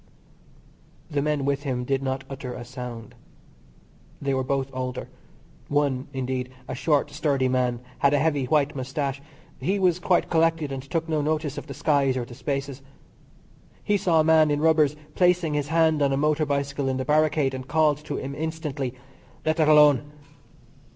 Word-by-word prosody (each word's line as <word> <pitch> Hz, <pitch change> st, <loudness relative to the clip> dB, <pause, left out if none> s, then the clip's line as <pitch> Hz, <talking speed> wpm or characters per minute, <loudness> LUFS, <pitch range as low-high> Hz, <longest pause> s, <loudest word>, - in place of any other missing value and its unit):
The 145 Hz, -1 st, 0 dB
men 150 Hz, -1 st, 0 dB
with 140 Hz, 0 st, 0 dB
him 125 Hz, -3 st, -2 dB
did 135 Hz, +1 st, 0 dB
not 135 Hz, 0 st, -2 dB
utter 130 Hz, -2 st, -6 dB
a 120 Hz, -, -7 dB
sound. 125 Hz, -3 st, -8 dB, 1.1 s
They 140 Hz, -1 st, -1 dB
were 130 Hz, 0 st, 0 dB
both 135 Hz, 0 st, -1 dB
older. 125 Hz, 0 st, -4 dB, 0.6 s
One, 140 Hz, -3 st, 0 dB
indeed, 130 Hz, -1 st, -3 dB, 0.2 s
a -, -, -4 dB
short, 145 Hz, +2 st, +1 dB
sturdy 140 Hz, -4 st, +1 dB
man, 125 Hz, -2 st, 0 dB, 0.2 s
had 140 Hz, -, +4 dB
a 145 Hz, -, +3 dB
heavy 145 Hz, -2 st, +1 dB
white 145 Hz, +2 st, +1 dB
moustache. 135 Hz, +1 st, -3 dB, 0.4 s
He 195 Hz, +3 st, 0 dB
was 180 Hz, -3 st, +2 dB
quite 180 Hz, 0 st, +2 dB
collected, 165 Hz, -3 st, +1 dB
and 135 Hz, -1 st, -4 dB
took 165 Hz, +5 st, -3 dB
no 155 Hz, -2 st, 0 dB
notice 150 Hz, -1 st, -1 dB
of -, -, -12 dB
the 140 Hz, -, -7 dB
skies, 140 Hz, -3 st, +2 dB
or 120 Hz, -, -2 dB
the 120 Hz, -, -12 dB
spaces. 135 Hz, +1 st, -4 dB, 1.0 s
He 205 Hz, -, +2 dB
saw 175 Hz, -4 st, +2 dB
a -, -, +5 dB
man 160 Hz, -1 st, +5 dB
in 145 Hz, 0 st, +1 dB
rubbers 155 Hz, -2 st, +3 dB, 0.2 s
placing 180 Hz, -3 st, +2 dB
his 145 Hz, -1 st, -1 dB
hand 160 Hz, -1 st, +2 dB
on 140 Hz, -1 st, +3 dB
a 135 Hz, -, +1 dB
motor 150 Hz, +1 st, +1 dB
bicycle 140 Hz, -1 st, -1 dB
in 130 Hz, -, -1 dB
the 130 Hz, -, -3 dB
barricade, 150 Hz, -1 st, +2 dB
and 130 Hz, 0 st, -6 dB
called 150 Hz, -1 st, +2 dB
to -, -, -3 dB
him 135 Hz, +1 st, -5 dB
instantly: 150 Hz, -4 st, -4 dB, 0.5 s
"Let 155 Hz, +1 st, +1 dB
that 155 Hz, -2 st, +3 dB
alone." 150 Hz, -1 st, +5 dB
140 Hz, 180 wpm, -25 LUFS, 130-155 Hz, 1.1 s, a